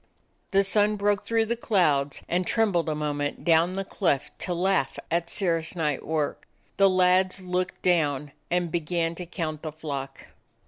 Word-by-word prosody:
The 195 Hz, 0 st, +3 dB
sun 210 Hz, +2 st, +2 dB
broke 205 Hz, 0 st, 0 dB
through 225 Hz, -1 st, +2 dB
the 235 Hz, +2 st, -1 dB
clouds 155 Hz, -12 st, +1 dB
and 180 Hz, +1 st, 0 dB
trem 225 Hz, -2 st, +2 dB
bled 170 Hz, -3 st, 0 dB
a 155 Hz, -, -1 dB
moment 145 Hz, -1 st, -3 dB
down 170 Hz, +2 st, +4 dB
the 195 Hz, 0 st, -2 dB
cleft 165 Hz, -9 st, -1 dB
to 180 Hz, -, -2 dB
laugh 180 Hz, -6 st, +1 dB
at 170 Hz, 0 st, 0 dB
Sir 175 Hz, -4 st, +1 dB
rah's 165 Hz, +1 st, -5 dB
night 150 Hz, -5 st, -1 dB
work. 155 Hz, -2 st, -2 dB, 0.3 s
The 195 Hz, -1 st, +6 dB
lads 185 Hz, +1 st, +3 dB
looked 180 Hz, 0 st, -2 dB
down 150 Hz, -5 st, +1 dB, 0.2 s
and 175 Hz, -1 st, 0 dB
began 170 Hz, 0 st, -1 dB
to 175 Hz, +1 st, -8 dB
count 155 Hz, -4 st, -4 dB
the 155 Hz, -, -5 dB
flock. 145 Hz, -3 st, -6 dB
175 Hz, 175 wpm, -26 LUFS, 155-190 Hz, 0.3 s, The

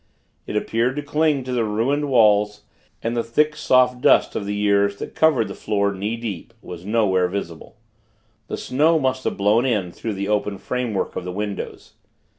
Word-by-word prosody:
It -, -, -5 dB
appeared 115 Hz, +4 st, 0 dB
to 145 Hz, -, -3 dB
cling 150 Hz, -1 st, +1 dB
to 130 Hz, -, -6 dB
the 120 Hz, -2 st, +1 dB
ruined 125 Hz, +8 st, 0 dB
walls; 105 Hz, -4 st, +3 dB, 0.4 s
and 115 Hz, +1 st, -1 dB
the 120 Hz, -, 0 dB
thick, 150 Hz, +6 st, +1 dB
soft 130 Hz, -4 st, +3 dB
dust -, -, +4 dB
of 100 Hz, -, -3 dB
the 105 Hz, -, -2 dB
years, 100 Hz, -1 st, +2 dB
that -, -, -8 dB
covered 145 Hz, -9 st, +3 dB
the 100 Hz, -, -6 dB
floor 100 Hz, 0 st, -1 dB
knee 100 Hz, +4 st, -3 dB
deep, 115 Hz, 0 st, -6 dB
was 90 Hz, -5 st, -9 dB
nowhere 100 Hz, -5 st, +2 dB
visible. 90 Hz, -4 st, -6 dB, 0.7 s
The -, -, -4 dB
snow 155 Hz, +5 st, +2 dB
must 130 Hz, -3 st, -1 dB
have -, -, -1 dB
blown 105 Hz, +4 st, +3 dB
in 105 Hz, -9 st, 0 dB
through 110 Hz, +4 st, -5 dB
the 100 Hz, +1 st, -3 dB
open 105 Hz, -1 st, -1 dB
framework 115 Hz, 0 st, -3 dB
of -, -, -3 dB
the 90 Hz, -, -5 dB
windows. 100 Hz, +1 st, -5 dB
110 Hz, 185 wpm, -22 LUFS, 100-125 Hz, 0.7 s, dust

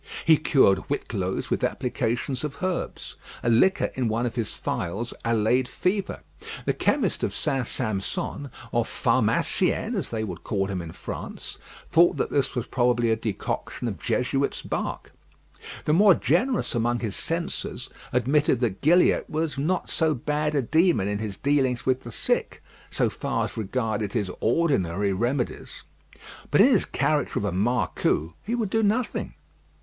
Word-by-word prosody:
He 160 Hz, -, +7 dB
cured 130 Hz, -10 st, +4 dB
whitlows 95 Hz, -9 st, -2 dB
with -, -, 0 dB
applications 125 Hz, +3 st, -1 dB
of 150 Hz, +3 st, -5 dB
herbs. 185 Hz, -1 st, -3 dB, 0.3 s
A 120 Hz, -, +2 dB
liquor 190 Hz, +12 st, +3 dB
in 130 Hz, -2 st, -1 dB
one 115 Hz, +2 st, 0 dB
of 120 Hz, -, -2 dB
his 115 Hz, -4 st, -2 dB
phials 100 Hz, +8 st, -3 dB
allayed 115 Hz, +2 st, +2 dB
fever. 190 Hz, +8 st, -2 dB, 0.4 s
The -, -, +2 dB
chemist -, -, 0 dB
of -, -, -1 dB
St. 130 Hz, -3 st, -1 dB
Sampson, 110 Hz, +5 st, -3 dB, 0.2 s
or -, -, +2 dB
pharmacien, -, -, +1 dB
as -, -, -2 dB
they 110 Hz, -1 st, -2 dB
would 90 Hz, -6 st, -6 dB
call 100 Hz, -3 st, 0 dB
him 95 Hz, -2 st, -3 dB
in 85 Hz, -1 st, -7 dB
France, -, -, -7 dB, 0.3 s
thought 170 Hz, +1 st, +5 dB
that -, -, -1 dB
this 140 Hz, -1 st, 0 dB
was 120 Hz, -, -1 dB
probably 120 Hz, -2 st, +2 dB
a -, -, +4 dB
decoction 110 Hz, +2 st, -3 dB
of 100 Hz, -7 st, -4 dB
Jesuits' 135 Hz, +2 st, 0 dB
bark. -, -, -4 dB, 0.7 s
The 150 Hz, -, +2 dB
more 195 Hz, +2 st, +7 dB
generous 200 Hz, -, +1 dB
among 120 Hz, +1 st, 0 dB
his 110 Hz, -5 st, -3 dB
censors 165 Hz, +1 st, -3 dB, 0.2 s
admitted 130 Hz, +2 st, +2 dB
that 105 Hz, -6 st, -1 dB
Gilliatt 175 Hz, +4 st, +4 dB
was 155 Hz, -2 st, -2 dB
not 175 Hz, +6 st, 0 dB
so 160 Hz, -2 st, +2 dB
bad 150 Hz, +4 st, -1 dB
a 140 Hz, -, +2 dB
demon 160 Hz, -, +3 dB
in 105 Hz, 0 st, -2 dB
his 105 Hz, -2 st, -4 dB
dealings 135 Hz, -3 st, +1 dB
with 130 Hz, 0 st, +1 dB
the 120 Hz, -, -9 dB
sick, -, -, -1 dB, 0.3 s
so -, -, +1 dB
far -, -, -2 dB
as -, -, -7 dB
regarded 110 Hz, -1 st, -2 dB
his 105 Hz, -6 st, -1 dB
ordinary 105 Hz, -, +1 dB
remedies. 120 Hz, +6 st, -2 dB, 0.7 s
But -, -, +5 dB
in 245 Hz, -, +7 dB
his 225 Hz, -9 st, +3 dB
character 145 Hz, 0 st, 0 dB
of 100 Hz, -, -1 dB
a 100 Hz, -, 0 dB
marcou, 95 Hz, -5 st, 0 dB
he 230 Hz, +3 st, -2 dB
would 220 Hz, -5 st, -2 dB
do 225 Hz, -, +2 dB
nothing. 220 Hz, +4 st, 0 dB
125 Hz, 160 wpm, -25 LUFS, 110-155 Hz, 0.7 s, He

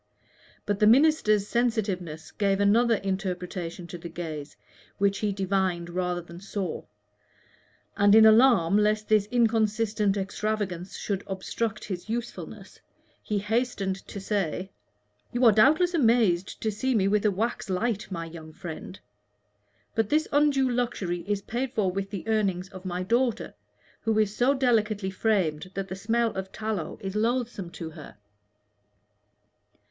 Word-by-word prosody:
But 205 Hz, -1 st, -1 dB
the 210 Hz, -, +5 dB
minister's 230 Hz, -6 st, +4 dB
sensitiveness 195 Hz, -10 st, -1 dB
gave 200 Hz, -1 st, 0 dB
another 225 Hz, +3 st, +4 dB
interpretation 180 Hz, -3 st, -4 dB
to 175 Hz, 0 st, -8 dB
the 170 Hz, 0 st, -7 dB
gaze 155 Hz, -4 st, -6 dB, 0.4 s
which 200 Hz, 0 st, +1 dB
he 210 Hz, -1 st, 0 dB
divined 190 Hz, -3 st, -1 dB
rather 180 Hz, 0 st, -1 dB
than 170 Hz, 0 st, -11 dB
saw; 195 Hz, -2 st, -4 dB, 1.1 s
and 200 Hz, +1 st, +5 dB
in 220 Hz, 0 st, +8 dB
alarm 215 Hz, -5 st, +6 dB
lest 215 Hz, 0 st, +1 dB
this 210 Hz, -2 st, +3 dB
inconsistent 215 Hz, -3 st, +1 dB
extravagance 195 Hz, -2 st, -3 dB
should 200 Hz, -2 st, -3 dB
obstruct 215 Hz, +3 st, -3 dB
his 185 Hz, 0 st, -6 dB
usefulness, 235 Hz, +1 st, -6 dB, 0.4 s
he 210 Hz, -, -2 dB
hastened 210 Hz, -2 st, -1 dB
to 200 Hz, -, -7 dB
say 190 Hz, -2 st, -2 dB, 0.6 s
"You 245 Hz, +1 st, +1 dB
are 225 Hz, -, +9 dB
doubtless 305 Hz, -, +4 dB
amazed 225 Hz, -, +2 dB
to 220 Hz, -, +1 dB
see 260 Hz, +5 st, -1 dB
me 195 Hz, -3 st, +3 dB
with 205 Hz, +1 st, +2 dB
a 215 Hz, -, +4 dB
wax 210 Hz, +2 st, -2 dB
light, 210 Hz, +3 st, -1 dB
my 165 Hz, -2 st, -4 dB
young 160 Hz, -1 st, -10 dB
friend; 175 Hz, +3 st, -8 dB, 0.9 s
but 225 Hz, -2 st, 0 dB
this 310 Hz, +1 st, +2 dB
undue 285 Hz, -2 st, +3 dB
luxury 235 Hz, -8 st, -2 dB
is 205 Hz, -1 st, -1 dB
paid 245 Hz, +4 st, -3 dB
for 200 Hz, -6 st, +1 dB
with 195 Hz, +1 st, -3 dB
the 200 Hz, 0 st, -6 dB
earnings 195 Hz, -4 st, 0 dB
of 190 Hz, -1 st, -11 dB
my 180 Hz, 0 st, -2 dB
daughter, 235 Hz, +4 st, 0 dB, 0.5 s
who 220 Hz, -1 st, 0 dB
is 215 Hz, -1 st, +1 dB
so 265 Hz, +3 st, +3 dB
delicately 215 Hz, -6 st, +1 dB
framed 185 Hz, -6 st, 0 dB
that 195 Hz, -1 st, -4 dB
the 190 Hz, -, -4 dB
smell 225 Hz, +3 st, 0 dB
of 190 Hz, 0 st, -5 dB
tallow 215 Hz, -7 st, -4 dB
is 195 Hz, 0 st, -5 dB
loathsome 230 Hz, -4 st, -1 dB
to 165 Hz, -1 st, -7 dB
her." 155 Hz, -8 st, -12 dB
205 Hz, 145 wpm, -27 LUFS, 185-225 Hz, 1.1 s, are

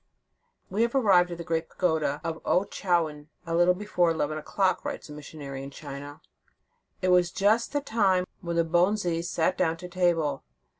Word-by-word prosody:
" -, -, -46 dB
We 220 Hz, +5 st, +2 dB
arrived 200 Hz, -9 st, +4 dB
at 175 Hz, -, -6 dB
the 170 Hz, -, -6 dB
great 165 Hz, 0 st, -2 dB
pagoda 160 Hz, -5 st, 0 dB
of 165 Hz, -1 st, -4 dB
Ouen 185 Hz, -, +2 dB
chou -, -, -9 dB
yuen, 155 Hz, -4 st, +1 dB, 0.2 s
a 165 Hz, -, -4 dB
little 175 Hz, +2 st, +4 dB
before 180 Hz, -3 st, +1 dB
eleven 155 Hz, -2 st, -1 dB
o 155 Hz, -, -4 dB
clock," 190 Hz, +3 st, 0 dB
writes -, -, -5 dB
a -, -, -9 dB
missionary 145 Hz, -2 st, -8 dB
in 135 Hz, -, -7 dB
China. 145 Hz, 0 st, -9 dB, 0.8 s
"It 185 Hz, -, +2 dB
was 180 Hz, -1 st, +4 dB
just 215 Hz, +6 st, +2 dB
the 290 Hz, 0 st, 0 dB
time 200 Hz, -8 st, +2 dB, 0.2 s
when 170 Hz, -2 st, -3 dB
the 170 Hz, 0 st, +2 dB
bonzes 175 Hz, 0 st, +1 dB
sat 170 Hz, +2 st, 0 dB
down 165 Hz, 0 st, +1 dB
to 180 Hz, -, -8 dB
table. 170 Hz, -6 st, 0 dB
175 Hz, 190 wpm, -27 LUFS, 160-185 Hz, 0.8 s, arrived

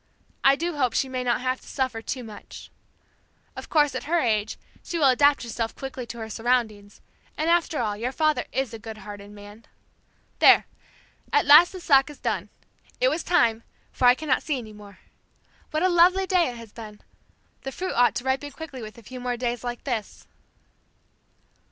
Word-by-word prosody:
I 270 Hz, 0 st, +6 dB
do 335 Hz, +1 st, -3 dB
hope 255 Hz, -4 st, +1 dB
she 270 Hz, -, +1 dB
may 255 Hz, -1 st, -3 dB
not 245 Hz, 0 st, 0 dB
have 255 Hz, 0 st, -2 dB
to -, -, -18 dB
suffer 260 Hz, -4 st, -2 dB
too 255 Hz, +2 st, -5 dB
much. 215 Hz, -2 st, -11 dB, 0.8 s
Of -, -, -9 dB
course, 295 Hz, -2 st, +3 dB
at -, -, -5 dB
her 335 Hz, +4 st, +1 dB
age 215 Hz, -6 st, 0 dB, 0.2 s
she 345 Hz, -, -5 dB
will 305 Hz, -, +3 dB
adapt 285 Hz, +2 st, +4 dB
herself 230 Hz, -1 st, -4 dB
quickly 265 Hz, -2 st, -7 dB
to 235 Hz, -, -8 dB
her 220 Hz, -1 st, -6 dB
surroundings, 220 Hz, -3 st, -2 dB, 0.4 s
and 315 Hz, +2 st, +1 dB
after 340 Hz, -2 st, +1 dB
all, 215 Hz, -4 st, -1 dB
your 235 Hz, +4 st, -3 dB
father 310 Hz, +2 st, +1 dB
is 265 Hz, -3 st, -2 dB
a 225 Hz, -, -7 dB
good 220 Hz, 0 st, -9 dB
hearted 205 Hz, 0 st, -10 dB
man. 205 Hz, +2 st, -13 dB, 0.7 s
There! -, -, +7 dB, 0.7 s
At 435 Hz, -5 st, +3 dB
last 300 Hz, +5 st, +8 dB
the 375 Hz, -, -8 dB
sock 275 Hz, -5 st, +4 dB
is 295 Hz, -, -11 dB
done! -, -, -3 dB, 0.5 s
It -, -, +4 dB
was 335 Hz, -, -2 dB
time, 235 Hz, -12 st, +2 dB, 0.3 s
for -, -, -1 dB
I 245 Hz, -, +7 dB
cannot 280 Hz, -2 st, 0 dB
see 295 Hz, -3 st, -2 dB
any 220 Hz, -4 st, -9 dB
more. 205 Hz, -2 st, -14 dB, 0.7 s
What 310 Hz, +2 st, -1 dB
a -, -, +5 dB
lovely 365 Hz, +2 st, +4 dB
day 365 Hz, -5 st, +2 dB
it 240 Hz, -, -8 dB
has 230 Hz, -2 st, -12 dB
been! 215 Hz, -2 st, -10 dB, 0.6 s
The 270 Hz, -, -6 dB
fruit 370 Hz, +7 st, -4 dB
ought 245 Hz, 0 st, +3 dB
to -, -, -3 dB
ripen 265 Hz, +2 st, -1 dB
quickly 280 Hz, -3 st, -9 dB
with 215 Hz, +1 st, -9 dB
a 235 Hz, -, -14 dB
few 255 Hz, +4 st, -9 dB
more 245 Hz, -1 st, -3 dB
days 240 Hz, -1 st, -3 dB
like 240 Hz, -1 st, -5 dB
this." 235 Hz, -6 st, -4 dB
255 Hz, 195 wpm, -25 LUFS, 225-295 Hz, 0.8 s, last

